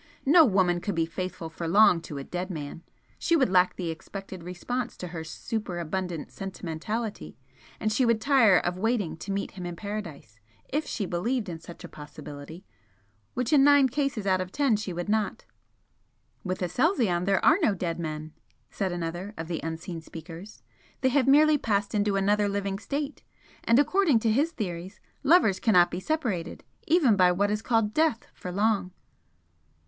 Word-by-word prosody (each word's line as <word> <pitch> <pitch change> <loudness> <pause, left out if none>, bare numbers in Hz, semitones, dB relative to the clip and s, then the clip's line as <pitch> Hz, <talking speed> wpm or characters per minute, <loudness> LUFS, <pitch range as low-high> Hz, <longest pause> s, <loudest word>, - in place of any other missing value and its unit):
No 315 +3 +7
woman 185 -6 +2
could 200 -1 -3
be 165 0 +1
faithful 180 0 -5
for 165 +1 -6
long 180 -1 +5
to 150 -3 -8
a 140 - -5
dead 180 +5 -4
man 155 -2 -6 0.4
she 335 - +2
would 270 -9 +3
lack 180 -1 +4
the 175 -3 -3
expected 190 +3 -8
response 220 +8 -4
to 180 - -6
her 165 -1 -6
superabundant 175 -1 -4
sentimentality, 195 +4 -5 0.4
and 215 0 0
she 255 - +2
would 230 -2 +3
tire 230 -7 +5
of 175 +1 -1
waiting 210 -7 0
to 200 - -6
meet 200 0 -2
him 185 - -8
in 175 - -5
Paradise 170 - -7 0.3
if 295 +2 -1
she 205 - -2
believed 210 +5 -1
in 165 -2 -6
such 170 +2 -12
a - - -7
possibility, 150 +3 -10 0.7
which 250 +4 -1
in 280 -2 +6
nine 285 -1 +6
cases 270 -5 -2
out 185 -1 +2
of 185 0 -5
ten 275 -3 +2
she 205 -2 -4
would 175 +1 -4
not." 215 0 -1 1.0
"With 185 0 -3
Aselzion 195 - +1
there 195 -1 +2
are 330 - +6
no 220 -11 +3
dead 170 -2 -3
men" 155 -1 -5 0.4
said 195 -3 -2
another 175 +4 -4
of 165 0 -5
the 165 -2 -3
unseen 165 +1 -5
speakers 165 +6 -10 0.4
"They 260 - +3
have 270 0 +2
merely 300 +2 +6
passed 200 -3 0
into 205 -1 +1
another 205 +1 +2
living 200 -1 -2
state. 280 +8 -4 0.4
And 230 - +4
according 310 0 +4
to 225 - +2
his 290 +9 +2
theories, 185 - -5 0.2
lovers 275 - +4
cannot 180 -6 +4
be 180 - -3
separated, 205 - -2 0.2
even 310 - +4
by 180 -2 +5
what 200 +3 +1
is 210 0 -1
called 225 -3 +1
death, 310 -7 +1
for 180 - -7
long." 200 -1 +1
195 Hz, 175 wpm, -27 LUFS, 175-230 Hz, 1.0 s, No